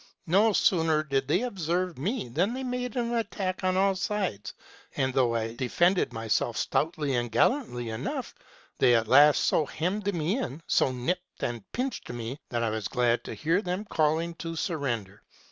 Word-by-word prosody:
No 200 +7 +4
sooner 160 -5 +3
did 135 -3 -1
they - - +2
observe 180 - -2
me 205 - -2
than 180 - 0
they 265 - -4
made 250 -2 -3
an 240 -1 -1
attack 200 -5 -2
on 185 0 +1
all 195 +1 +3
sides; 185 - -2 0.5
and, 130 -1 +1
though 125 -3 +2
I 115 0 -2
defended 175 +8 +2
myself 115 -2 -1
stoutly 150 -3 0
and 120 -1 -1
gallantly 120 - +1
enough, 110 - -4 0.5
they 120 - +5
at 115 -1 +1
last 145 +5 +6
so - - +3
hemmed 200 +7 -1
me 175 - -1
in, 155 - -5
so 130 - +2
nipped 175 +9 -4
and 120 -4 -4
pinched 260 +2 -3
me, 120 +3 -5
that 120 -1 -1
I 115 - 0
was 110 -2 -2
glad 120 -1 +1
to - - -6
hear 165 +6 +1
them 185 +2 -3
calling 160 -1 +1
to 165 -1 -5
surrender. 120 - -3
160 Hz, 175 wpm, -28 LUFS, 120-195 Hz, 0.5 s, last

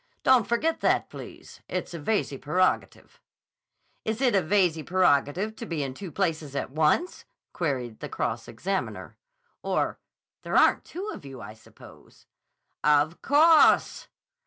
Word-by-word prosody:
"Don't 255 -5 +4
forget 315 +8 0
that, - - +1
please. - - -11
It's - - -4
a 170 - -5
Veyze 155 -3 -1
prerogative." 180 +6 -1 0.8
"Is 220 +1 -2
it 260 -3 +2
a 195 - +4
Veyze 175 -2 +1
prerogative 180 +3 +1
to 230 - -6
be 160 -4 -2
in 135 -1 -5
two 180 +5 -8
places 160 -7 -2
at 140 - -3
once?" 155 - +1 0.3
queried 130 -9 -3
the - - -7
cross - - -3
examiner. 190 +12 -4 0.5
"Or—there - - -4
aren't - - +4
two 375 +5 -7
of - - -10
you, 135 -2 -10
I 110 - -9
suppose." 110 - -18 0.6
"Of 150 +2 +2
_cawse! 310 +3 +4
175 Hz, 135 wpm, -26 LUFS, 145-220 Hz, 0.8 s, Don't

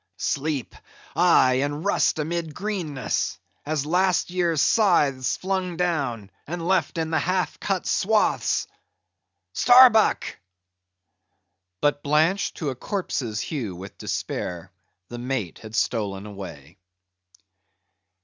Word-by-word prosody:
Sleep? 145 -2 -2 0.4
Aye, 135 -7 +4
and 145 +4 -3
rust 200 - +2
amid 160 0 -3
greenness; 180 -10 -2 0.3
as 150 -2 -1
last 180 +2 +1
year's 175 -3 +1
scythes 145 - +3
flung 185 -2 -2
down, 135 - -1 0.2
and 170 +1 -4
left 185 -4 +1
in 160 0 -2
the 160 - +2
half 185 +1 -1
cut 195 -3 -2
swaths—Starbuck!" 220 +3 +2 1.4
But 145 0 +1
blanched 155 +7 +1
to 150 - -2
a - - -6
corpse's 125 - -3
hue 115 - -4
with 95 +3 -10
despair, 85 -2 -4 0.4
the 120 - -7
Mate 120 -8 -3
had 110 0 -9
stolen 100 -5 -1
away. 90 -5 -10
155 Hz, 105 wpm, -24 LUFS, 125-180 Hz, 1.4 s, Aye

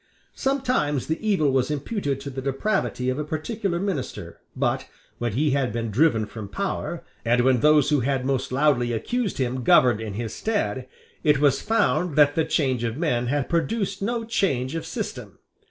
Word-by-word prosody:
Sometimes 255 - 0
the 160 - -2
evil 155 -9 +3
was 130 0 +1
imputed 145 - -2
to 140 - -6
the 135 0 -5
depravity 135 -1 -1
of 130 - -3
a - - -1
particular 170 +4 -2
minister: 130 - -4 0.2
but, - - -1 0.3
when 120 -3 -1
he 145 +5 +1
had 135 -3 +1
been 115 0 -3
driven 115 -2 +3
from 110 -1 -8
power, 100 - -3 0.2
and 120 +1 +3
when 130 0 +3
those 150 +1 +4
who 150 - +4
had 130 +1 0
most 135 -2 -1
loudly 130 -3 +2
accused 230 - -2
him 130 -1 -1
governed 115 -1 +5
in 105 -3 -5
his 115 0 -4
stead, 130 - -2 0.4
it 150 -2 +4
was 140 -2 +3
found 205 -7 +1
that 145 -1 +5
the 160 0 +1
change 130 -5 0
of 115 +1 -2
men 125 -7 0
had 140 +1 0
produced 195 +3 -1
no 230 +3 -1
change 145 - 0
of 165 - -4
system. - - -6
140 Hz, 180 wpm, -24 LUFS, 125-170 Hz, 0.4 s, governed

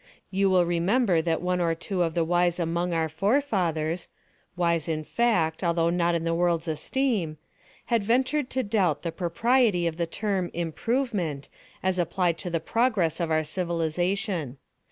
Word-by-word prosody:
You 195 0 +2
will 180 -2 +4
remember 175 +2 +2
that 165 +1 -1
one 180 0 0
or 165 -1 +1
two 180 +2 -3
of 165 -1 0
the 170 - +2
wise 175 +1 +1
among 170 +1 -1
our 165 -1 +1
forefathers—wise 170 - -1
in 155 -1 -2
fact, 175 -6 +1
although 170 -1 +2
not 170 -1 +1
in 165 - -1
the 165 0 0
world's 170 -1 +1
esteem—had 190 - -2
ventured 260 +5 +1
to 260 - -1
doubt 200 - +1
the 170 - -2
propriety 195 +2 +2
of 165 -1 -2
the 170 -1 -1
term 195 -1 -2
"improvement," 175 - -2 0.3
as 185 -1 +1
applied 175 0 0
to 180 - -4
the 165 -1 0
progress 220 -7 +1
of 170 -2 -1
our 155 0 +2
civilization. 170 - -1
175 Hz, 155 wpm, -26 LUFS, 165-200 Hz, 0.3 s, will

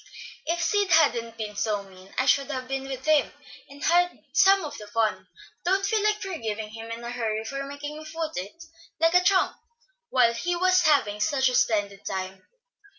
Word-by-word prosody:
"If 335 +2 0
Sid 410 0 +1
hadn't 240 -9 +3
been 210 -2 -5
so 205 -1 -1
mean, 190 0 -16
I 260 - +2
should 275 +1 +3
have 255 -3 -4
been 270 0 -3
with 265 -1 -6
him, 310 -2 +3 0.4
and 285 +1 -11
had 355 +1 +2
some 390 -2 +5
of 295 - -7
the 210 - -10
fun. 220 0 +1
I - - -19 0.4
don't 390 +1 +2
feel 440 -2 +1
like 425 0 +1
forgiving 220 - -4
him 225 +1 -9
in 230 +1 -6
a 235 - -5
hurry 220 -2 -2
for 275 +4 -4
making 290 +2 -7
me - - -9
foot 320 0 -4
it, 200 - -6 0.4
like 330 +1 +3
a 360 0 +5
tramp, 375 0 +2 0.5
while 240 -2 +4
he 350 +9 -1
is 370 +1 +3
having 260 -9 +3
such 265 +3 +2
a - - -4
splendid 205 -4 +1
time." 190 0 -5
270 Hz, 200 wpm, -26 LUFS, 220-335 Hz, 0.5 s, some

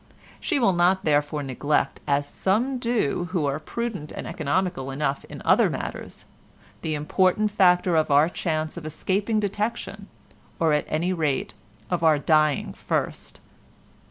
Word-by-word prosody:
She 335 - 0
will 230 -8 +3
not 180 +2 +2
therefore 145 -1 +1
neglect—as 140 +1 0
some 240 - 0
do 225 - 0
who 165 -6 +1
are 140 +1 -1
prudent 200 -2 -5
and - - -6
economical 155 -2 -1
enough 135 0 -2
in - - -10
other - - +5
matters—the 155 -1 -7
important 185 +7 +1
factor 180 -3 +4
of 155 -1 +2
our 145 +2 +5
chance 160 -2 -3
of 165 - -7
escaping 200 +7 -1
detection, 210 +2 -3 0.5
or 160 -2 +3
at 150 - +1
any 170 +4 0
rate 150 -10 -1 0.4
of 180 - 0
our 160 -2 +5
dying 155 0 +2
first. - - -3
165 Hz, 135 wpm, -25 LUFS, 150-190 Hz, 0.5 s, other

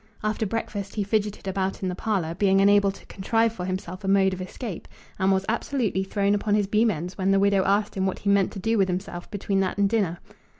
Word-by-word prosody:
After 215 0 -1
breakfast 200 -2 -4
he 210 - 0
fidgeted 205 -1 -1
about 190 0 -2
in - - 0
the - - -2
parlour, 185 -5 -1
being 195 +2 +3
unable 200 0 +5
to 195 - -9
contrive 225 +3 0
for 180 -5 -5
himself 185 0 -5
a - - -4
mode 195 -1 +3
of 185 - -5
escape, 185 +1 -6 0.3
and 190 0 +3
was 190 0 +1
absolutely 230 -4 -1
thrown 200 +1 0
upon 205 0 +1
his 210 -1 +2
beam 215 +3 +2
ends 180 +1 -4
when 190 +1 +1
the 195 0 +4
widow 200 -1 +3
asked 205 +2 +1
him 190 0 0
what 190 - -2
he 200 - -2
meant 200 -2 +3
to 200 - -6
do 225 +2 +1
with 195 - +3
himself 180 -1 -4
between 200 -1 -1
that 190 0 -1
and 200 0 +3
dinner. 195 -6 0
195 Hz, 240 wpm, -25 LUFS, 190-210 Hz, 0.3 s, unable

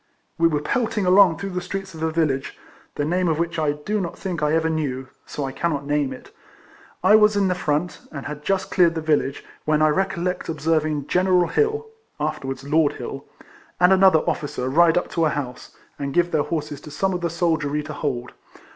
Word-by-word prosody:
We 165 - +5
were 150 -2 -1
pelting 225 0 0
along 180 -2 +6
through 200 -1 -5
the 180 0 -3
streets 195 +1 -5
of 160 - -9
a 160 0 0
village, 150 -5 -1 0.4
the 145 - -1
name 180 +3 +1
of 160 -2 +1
which 170 0 -2
I 150 -2 +1
do 205 +8 -2
not 170 - -5
think 180 -5 -4
I 150 0 +2
ever 160 0 +2
knew, 135 -5 -2 0.2
so 145 - -4
I 135 - -4
cannot 145 -1 -2
name 145 -2 0
it; 130 - -10 0.7
I 200 +3 +7
was 210 -1 +5
in 195 -2 +2
the - - +2
front, 160 0 -2
and 140 -3 -7
had 150 0 -6
just 195 +2 -1
cleared 170 -3 +4
the 160 - -2
village, 150 -3 0 0.2
when 155 0 +2
I 155 0 +4
recollect 185 +1 -1
observing 155 -2 0
General 180 +1 +2
Hill 440 0 +1 0.3
(afterwards 135 0 -3
Lord 150 +1 +2
Hill) - - -7 0.5
and 180 +1 +6
another 190 -4 +5
officer 140 -3 -2
ride 165 +4 +4
up 180 - -1
to 165 -2 +1
a - - +3
house, 135 -4 -6 0.2
and 140 -1 -4
give 175 0 +2
their 155 - +2
horses 150 -2 -4
to - - -10
some 190 +6 -1
of 180 - -3
the 170 - 0
soldiery 160 -3 0
to 155 0 -7
hold. 130 -4 -3
160 Hz, 210 wpm, -23 LUFS, 150-180 Hz, 0.7 s, I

